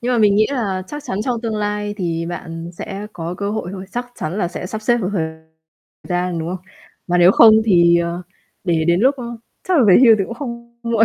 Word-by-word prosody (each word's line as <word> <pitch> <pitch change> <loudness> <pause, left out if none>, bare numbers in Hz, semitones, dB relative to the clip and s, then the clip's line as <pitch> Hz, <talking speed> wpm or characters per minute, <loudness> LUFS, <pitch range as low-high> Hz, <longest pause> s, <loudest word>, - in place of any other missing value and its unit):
nhưng 250 +1 -1
mà 240 - +2
mình 205 -2 +4
nghĩ 215 +1 +4
là 200 -9 -2
chắc 295 +5 -7
chắn 190 - -3
trong 240 -3 -1
tương 225 -2 -3
lai 210 0 -2
thì 165 -3 -2
bạn 165 -1 -6
sẽ 200 +4 -7
có 170 +1 -5
cơ 200 +2 -3
hội 210 -4 -3
thôi, 190 -1 -7
chắc 245 +1 -3
chắn 170 +6 -4
là 175 -4 0
sẽ 180 - -6
sắp 215 +3 -6
xếp 240 +1 +3
được 185 - -2
thời 170 -5 0 0.8
gian, 180 -1 -1
đúng 165 +1 -4
không? 185 0 -6 0.4
Mà 180 0 +1
nếu 175 +1 +7
không 220 -2 +8
thì, 170 -4 +5
ờ, 170 +1 -3 0.4
để 165 -3 +1
đến 170 +2 +3
lúc, 265 +5 +4
ơ, 250 - -7 0.4
chắc 360 -4 +3
là 250 - +5
về 185 - +8
hưu 230 - +8
thì 195 - +1
cũng 230 - -7
không 235 -2 -8
muộn. 230 -1 +3
200 Hz, 245 wpm, -19 LUFS, 175-230 Hz, 0.8 s, không